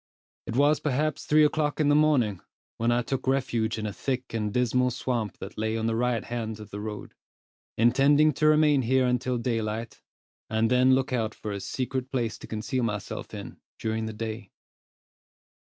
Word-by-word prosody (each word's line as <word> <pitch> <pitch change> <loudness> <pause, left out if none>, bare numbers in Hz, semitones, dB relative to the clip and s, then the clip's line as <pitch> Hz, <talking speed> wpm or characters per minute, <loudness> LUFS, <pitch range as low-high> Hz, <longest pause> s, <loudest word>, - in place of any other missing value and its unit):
It 115 - -3
was 145 +3 +4
perhaps 150 +2 -1
three 155 0 +6
o'clock 150 0 0
in 150 -2 +3
the - - +5
morning, 130 - +3 0.4
when 115 +1 +1
I 120 0 +2
took 130 +2 -3
refuge 120 -5 0
in 110 - -3
a 105 - -3
thick 130 +6 -3
and 105 -2 -1
dismal 125 +2 +2
swamp 120 -3 -2
that - - -8
lay 110 +1 0
on 110 - -2
the 115 0 0
right 120 -1 0
hand 110 -2 -4
of 105 - -11
the 100 - -5
road, 105 0 -6 0.6
intending 140 +6 +4
to 155 +3 +2
remain 150 -2 +5
here 130 +2 +2
until 125 0 0
daylight, 115 -1 -3 0.5
and 110 +1 +1
then 130 +1 +5
look 130 0 -1
out 110 -3 -1
for 105 - -6
a 100 - -3
secret 130 +4 -3
place 120 -4 -2
to - - -10
conceal 115 +4 -2
myself 105 -4 -4
in, - - -8 0.2
during 110 0 -2
the 110 - -5
day. 110 -1 -5
120 Hz, 185 wpm, -27 LUFS, 110-130 Hz, 0.6 s, three